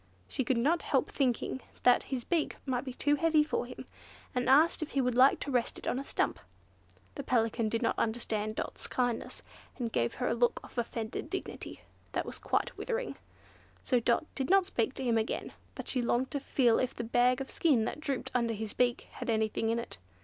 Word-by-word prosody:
She 265 - -1
could 250 +1 +1
not 305 +9 +2
help - - +1
thinking 260 -1 0 0.2
that 250 -1 +6
his 255 -3 -2
beak 330 +2 0
must 255 -1 -1
be 260 - -5
too 290 +2 +2
heavy 315 -1 +4
for 295 -5 -2
him, 250 - -9 0.5
and 250 0 0
asked 310 +6 +5
if 315 - -4
he 275 - +1
would 250 -2 +2
like 255 +3 +6
to 285 - -3
rest 245 -2 0
it - - -9
on - - 0
the 275 - -3
stump. - - -1 0.7
The - - -5
Pelican 225 -2 +1
did 230 +2 -1
not 230 - +1
understand 220 -2 -1
Dot's - - -4
kindness, 245 -2 -2 0.3
and 235 -3 -2
gave 120 - 0
her - - -1
a - - +2
look 240 +1 +2
of - - -13
offended 230 -1 -3
dignity - - -5 0.3
that - - -1
was - - -6
quite - - 0
withering; - - -2 0.7
so 250 - +3
Dot 235 +5 +2
did 265 -2 -2
not 385 -1 +5
speak 250 - -1
to - - -4
him 235 -3 +3
again; 220 - -3 0.2
but - - -7
she 255 - 0
longed 240 +2 0
to 285 - -1
feel 245 -4 +3
if 255 - -1
the 235 - -4
bag 245 +2 +3
of 270 - -4
skin 270 -10 +3
that 260 - -4
drooped 280 -4 -3
under 235 -2 +1
his 215 0 -5
beak 245 -1 +1
had - - -6
anything 220 0 +1
in 230 - +1
it. 235 - -6
245 Hz, 215 wpm, -31 LUFS, 230-275 Hz, 0.7 s, that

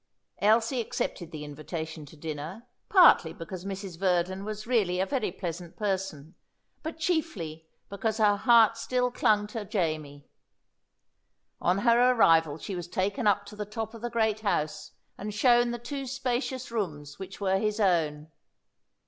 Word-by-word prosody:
Elsie 225 +4 +3
accepted 175 -6 -3
the 155 -2 -6
invitation 155 +1 -6
to 155 - -14
dinner, 160 +8 -6 0.2
partly 345 - +6
because 175 +2 -8
Mrs. 195 -3 -6
Verdon 185 0 +1
was 215 0 -5
really 205 -7 +1
a 190 - +2
very 250 -5 -1
pleasant 175 -1 -6
person, 190 -7 -3 0.5
but 320 +1 -5
chiefly 210 - -2 0.2
because 210 +2 -2
her 210 -2 +4
heart 230 +1 +5
still 250 +1 0
clung 210 -3 +2
to 210 +1 -5
Jamie. 155 -6 -3 1.3
On 180 +2 +2
her 240 +3 +4
arrival 165 -9 +4
she 190 +4 -6
was 175 -1 -5
taken 200 +7 -1
up 205 0 +3
to 205 - -11
the 210 - -3
top 220 +2 -5
of 230 - -10
the 240 - -2
great 220 -2 +1
house, 175 -8 -2 0.3
and 210 +1 -5
shown 240 +2 +4
the 240 - -3
two 270 +3 -5
spacious 255 -1 -2
rooms 150 -10 -4
which 190 0 -8
were 190 -1 +1
his 210 +1 -1
own. 160 -6 +1
200 Hz, 155 wpm, -28 LUFS, 165-230 Hz, 1.3 s, partly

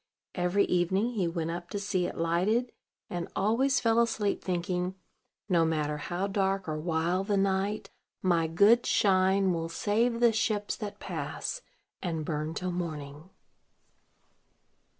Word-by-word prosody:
Every 180 +3 +2
evening 190 +6 +1
he 200 -7 0
went 165 -1 -2
up 175 +1 -6
to 205 - -3
see 185 -3 0
it - - -7
lighted, 185 +9 +1 0.4
and 175 -1 -4
always 250 +6 +2
fell 230 -1 +3
asleep, 220 -3 0
thinking, 180 0 -1 0.5
"No 175 -4 +3
matter 150 -2 0
how 175 +5 -3
dark 195 -1 0
or 155 -1 -2
wild 170 +4 0
the 205 -2 +2
night, 195 +1 0 0.3
my 170 -3 +3
good 205 +9 +4
Shine 190 -1 +3
will 165 -1 -2
save 230 +6 +1
the 235 -1 +5
ships 215 -2 0
that 210 -2 -6
pass, - - -4 0.4
and 165 -4 -2
burn 155 +1 -3
till 185 0 -2
morning." 155 -2 -5
185 Hz, 140 wpm, -29 LUFS, 170-205 Hz, 0.5 s, the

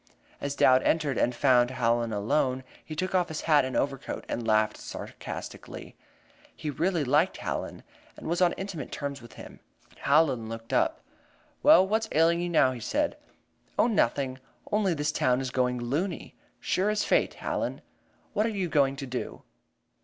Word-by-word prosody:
As 140 0 -3
Dowd 130 -1 +5
entered 150 -3 +1
and 125 - +1
found 125 -1 +4
Hallen 120 -2 0
alone, 130 +5 0 0.2
he 155 - -7
took 185 +4 -2
off 180 -2 +2
his 160 - -5
hat 150 -3 +4
and 130 0 -4
overcoat, 135 -1 -2
and 115 -1 -3
laughed 110 -1 +2
sarcastically. - - -8 0.6
He 155 -2 -4
really 170 +2 0
liked 150 +7 +2
Hallen, - - -4 0.3
and - - -11
was 170 +3 0
on 175 -1 +4
intimate 190 -8 -6
terms 140 -2 -4
with 120 -1 -13
him. - - -12 0.4
Hallen 140 -6 +2
looked 115 0 -7
up. 325 0 +1 0.6
"Well, 285 -11 +7
what's 220 +2 0
ailing 165 +2 +3
you 175 - -2
now?" 145 -6 +4
he 125 - -6
said. 290 - -1 0.6
"Oh, - - +5
nothing. 135 - +1 0.3
Only 205 -4 +2
this 150 0 0
town 125 -3 +2
is 130 -1 -3
going 125 -1 +1
loony, 145 +10 -3 0.3
sure 190 +3 0
as 210 0 +1
fate, - - +2
Hallen. - - -3 0.5
What 215 +1 +2
are - - 0
you 195 -5 -2
going 140 -3 +3
to 135 - -6
do?" 125 -1 -5
145 Hz, 170 wpm, -28 LUFS, 125-175 Hz, 0.6 s, Well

